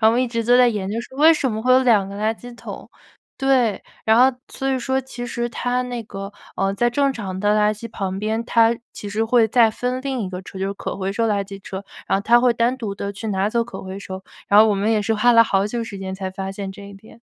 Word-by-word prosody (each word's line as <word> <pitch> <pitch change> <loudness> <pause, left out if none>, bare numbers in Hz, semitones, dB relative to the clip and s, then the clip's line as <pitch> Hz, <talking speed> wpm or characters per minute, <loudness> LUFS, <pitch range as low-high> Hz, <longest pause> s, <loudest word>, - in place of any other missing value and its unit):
后 220 - +6
我 - - +3
们 245 - +2
一 - - 0
直 230 -1 -2
都 245 +2 +4
在 250 - +6
研 200 -3 -2
究 225 - -2
说 260 +2 -12
为 320 +2 +7
什 265 -6 -1
么 215 - -3
会 250 +3 0
有 255 +1 +6
2 215 -6 +3
个 200 - -8
垃 215 +2 0
圾 245 +1 -11
桶。 - - -9 0.5
对， 260 -6 +2 0.2
然 220 - +5
后 260 0 +5
所 270 - -5
以 265 - +1
说 265 +2 0
其 250 -2 -6
实 240 0 -2
它 245 +2 -1
那 245 -2 -5
个， 195 -1 -7 0.2
呃， 195 0 +1
在 240 +5 +1
正 275 +3 +1
常 190 -6 -5
的 205 +2 +2
垃 210 0 +3
圾 230 +3 -8
旁 195 -3 -3
边， 220 +2 -1
它 230 0 +4 0.2
其 205 - -7
实 215 +2 0
会 225 0 +4
再 225 0 +4
分 250 +3 -3
另 270 -2 -2
一 190 - -4
个 180 0 -5
车， 190 0 -10
就 190 - -1
是 195 - -2
可 200 - -5
回 195 0 -2
收 230 +2 0
垃 200 -1 0
圾 195 0 -10
车， 195 +1 -7 0.2
然 195 - +2
后 - - -5
它 235 +3 +5
会 245 -1 +3
单 235 +2 +2
独 215 -5 -4
地 200 0 -4
去 205 +3 -7
拿 195 0 0
走 235 +1 +1
可 240 - -8
回 190 +1 -7
收， 190 -1 -8 0.2
然 205 - +6
后 220 - +8
我 210 - +2
们 205 +3 0
也 215 -2 +2
是 225 - 0
花 240 +3 +4
了 230 -1 +7
好 195 -2 +1
久 230 +2 -3
时 200 -3 -8
间 190 0 -5
才 190 -1 -5
发 190 0 -5
现 195 0 -6
这 200 0 -11
一 200 - -11
点。 220 +3 -16
220 Hz, 305 characters per minute, -21 LUFS, 200-245 Hz, 0.5 s, 后